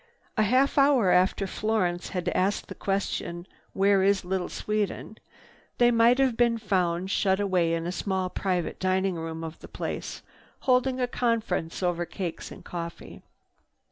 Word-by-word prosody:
A - - +2
half 260 +7 +3
hour 270 -9 +4
after 185 +2 +3
Florence 190 -3 -1
had 180 -3 -4
asked 195 +3 0
the - - -5
question, 190 -3 -3 0.3
"Where 195 0 +3
is 195 -1 +2
Little 185 0 -2
Sweden?" 215 +1 -3 0.6
they 240 0 +5
might 230 +1 +5
have 265 -3 +2
been 235 -1 +3
found 185 -4 0
shut 190 -1 +2
away 180 -4 +1
in 165 0 -3
a 175 - -2
small 190 0 -1
private 180 -1 -2
dining 190 0 +1
room 165 -1 -5
of 160 0 -7
the - - -11
place, - - -5 0.4
holding 255 0 +2
a 250 - +2
conference 225 -9 -1
over 175 -1 0
cakes 175 -4 -5
and - - -12
coffee. 170 -1 -7
190 Hz, 155 wpm, -27 LUFS, 180-225 Hz, 0.6 s, they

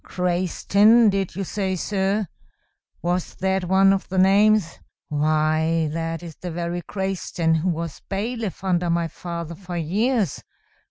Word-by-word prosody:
Crayston, 200 +5 +3
did 195 -3 -2
you 195 - -2
say, 190 0 -2
sir? 195 +3 0 0.8
Was 175 +1 -1
that 190 0 0
one 190 +2 +5
of 195 - -3
the 190 - -3
names? 200 -1 +4 0.3
Why, 155 +2 +1
that 165 0 -3
is 165 -3 -9
the 180 - -6
very 170 +1 -3
Crayston 190 -4 -2
who 170 +4 0
was 165 -2 -4
bailiff 210 0 -3
under 180 -2 +1
my 170 0 +1
father 170 0 -6
for 175 0 -7
years. 200 - 0
180 Hz, 140 wpm, -23 LUFS, 165-195 Hz, 0.8 s, one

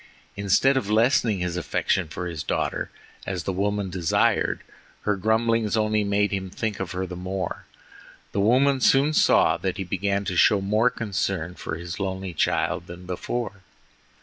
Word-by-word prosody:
Instead 100 +7 +3
of 115 -6 -2
lessening 110 -2 +3
his 90 -1 -2
affection 90 +1 0
for 90 - -5
his 85 -3 -4
daughter, - - -2 0.4
as 95 -4 -3
the 95 - -2
woman 100 0 -1
desired, 85 -3 +1 0.4
her 105 - +1
grumblings 110 +1 +1
only 110 -1 +2
made 100 0 +1
him 95 -1 -3
think 110 +2 -3
of 95 -2 -4
her 95 +1 -2
the 90 -1 -7
more. 95 +1 -4 0.7
The 100 - 0
woman 130 +5 +3
soon 140 +5 +4
saw 80 - +4
that 90 +1 -3
he 95 - -2
began 100 +2 -1
to 90 -1 -2
show 100 +3 +5
more 105 +5 +2
concern 95 -6 -2
for 85 - -5
his 85 +2 -6
lonely 95 -2 -3
child 85 +2 0
than 85 +1 -10
before. 100 +3 -4
100 Hz, 165 wpm, -25 LUFS, 90-110 Hz, 0.7 s, show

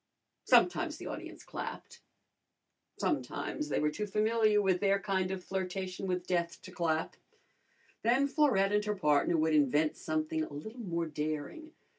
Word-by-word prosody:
Sometimes - - +3
the - - -9
audience - - -7
clapped. - - -7 1.0
Sometimes 300 - -2
they - - +1
were 150 0 +1
too 210 +7 -3
familiar 215 +1 +3
with 190 -3 +2
their 200 0 +3
kind 190 -2 0
of 190 -1 -4
flirtation 190 0 -3
with 180 -1 -1
death 170 -2 -1
to 185 - -10
clap. 165 -3 -1 0.9
Then 250 +5 +3
Florette 265 -10 +3
and 210 0 +3
her 210 0 0
partner 150 -1 +2
would 160 0 +2
invent 150 +1 +3
something 155 0 -1
a - - -7
little 220 - -8
more 170 -6 -2
daring. 155 - -4
185 Hz, 150 wpm, -32 LUFS, 160-210 Hz, 1.0 s, Sometimes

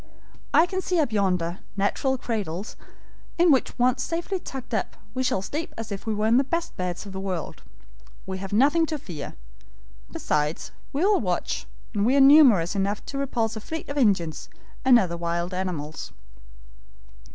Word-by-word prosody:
I 325 - +6
can 375 +1 -3
see 365 -1 -1
up 290 -7 +1
yonder 180 -4 0 0.2
natural 260 +7 +1
cradles, 205 -5 -4 0.6
in 345 -1 +5
which 265 - +2
once 250 0 +2
safely 345 +6 -2
tucked 265 -6 -8
up - - -1 0.2
we 260 - -1
shall 195 -7 0
sleep 315 - -5
as 225 -1 -6
if 200 +3 -6
we 220 - +1
were 210 +1 0
in 230 +2 +5
the 270 - +4
best 335 +5 -3
beds 180 +1 -3
in 200 - -8
the 190 - -5
world. 190 -3 -4 0.6
We 190 0 -4
have 195 0 -6
nothing 290 +9 +4
to 310 - -2
fear. 165 - -7 0.8
Besides, 150 +1 -1 0.2
we 295 +7 +1
will 410 0 +4
watch, - - -2 0.3
and 205 -2 +1
we 250 +5 +3
are - - +5
numerous 265 - +7
enough 200 +1 -1
to 275 - -5
repulse 235 -5 -1
a 220 - -6
fleet 320 +7 -6
of 285 - -4
Indians 185 - +1 0.3
and 260 -2 +7
other 180 -6 0
wild 170 +1 -2
animals." 170 -5 -4
220 Hz, 175 wpm, -25 LUFS, 185-275 Hz, 0.8 s, numerous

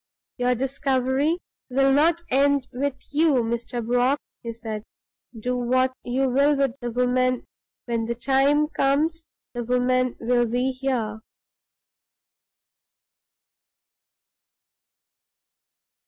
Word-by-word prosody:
"Your 250 0 +2
discovery 270 +4 0 0.3
will 270 +1 +3
not 330 +4 +3
end 280 0 +3
with 275 +2 -1 0.2
you, 290 -4 +3
Mr. 235 +1 -3
Brock," 245 +4 +2 0.2
he 230 - -5
said. 225 -2 -6 0.6
"Do 250 +3 -1
what 255 +1 +1
you 260 +2 0
will 280 +3 +3
with 275 -2 +2
the 240 - -3
woman, 250 +1 +1 0.4
when 230 -2 -1
the 235 +1 -2
time 275 +4 +2
comes 315 +3 0 0.3
the 240 -1 -3
woman 250 +1 +1
will 240 0 +2
be 250 +3 0
here." 250 -5 -2
255 Hz, 100 wpm, -24 LUFS, 245-275 Hz, 0.6 s, will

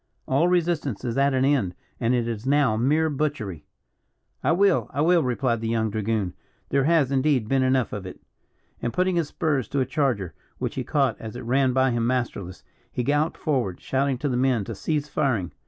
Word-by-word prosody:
All 140 +6 +3
resistance 170 - 0
is 120 -1 -2
at 140 -1 +3
an 130 0 +2
end, 130 -11 +1 0.2
and 120 +1 +2
it 120 -1 0
is 115 +1 -4
now 140 -5 +3
mere 145 +8 +2
butchery." 135 - -3 0.8
"I - - +3
will, 195 +2 +3
I - - -4
will," 170 +2 +4
replied 125 -3 0
the 115 - -2
young 110 -1 0
dragoon; 110 -3 -1 0.4
"there 140 -1 +2
has, 155 -4 +3
indeed, 135 -4 +2
been 135 +2 +2
enough 130 -1 +1
of 100 -2 -5
it." 90 - -10 0.6
And 120 - -2
putting 185 +4 +1
his 165 -3 +1
spurs 145 -6 -1
to 140 - -1
a 130 - +2
charger, 125 - -1 0.2
which - - -3
he - - -3
caught 135 -6 0
as 110 +1 -7
it 125 - -6
ran 130 +2 +2
by 130 0 +2
him 120 -1 0
masterless, 120 -8 -3 0.3
he 125 - -2
galloped 145 +4 +1
forward, 125 - -1
shouting 135 0 0
to 145 - -2
the 130 - 0
men 125 -4 +2
to 115 - -6
cease 150 +7 -2
firing. 130 - 0
130 Hz, 205 wpm, -25 LUFS, 115-145 Hz, 0.8 s, will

